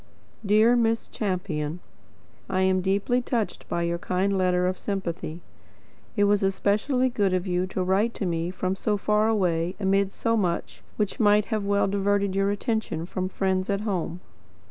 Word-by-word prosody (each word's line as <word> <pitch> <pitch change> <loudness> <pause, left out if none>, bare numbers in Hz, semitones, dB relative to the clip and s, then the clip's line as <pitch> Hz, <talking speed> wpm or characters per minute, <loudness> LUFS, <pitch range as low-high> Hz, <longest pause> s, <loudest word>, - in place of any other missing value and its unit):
Dear 215 +3 +5
Miss 230 -1 +1
Champion... 180 -6 -3 0.7
I 185 - +1
am 190 0 +3
deeply 200 +6 +1
touched 235 -3 -3
by 170 - -1
your 170 0 -1
kind 190 +3 0
letter 180 -1 +2
of 185 0 -1
sympathy... 175 -4 -4 0.8
It 205 - +4
was 205 0 +3
especially 205 +7 +1
good 205 -6 +1
of 180 0 -1
you 180 0 0
to 185 0 -2
write 200 +5 +1
to 200 - -3
me 170 -1 -1
from 185 +1 -2
so 210 +2 0
far 210 +2 +2
away 180 -5 +1
amid 195 0 +2
so 230 +2 0
much 180 -6 -2 0.2
which 210 -2 -1
might 210 0 +3
well 200 -2 +1
have 195 - 0
diverted 200 -1 +1
your 195 0 +2
attention 205 -5 -2
from 185 +1 -3
friends 190 0 -1
at 200 0 0
home." 180 -4 -3
195 Hz, 165 wpm, -26 LUFS, 185-210 Hz, 0.8 s, Dear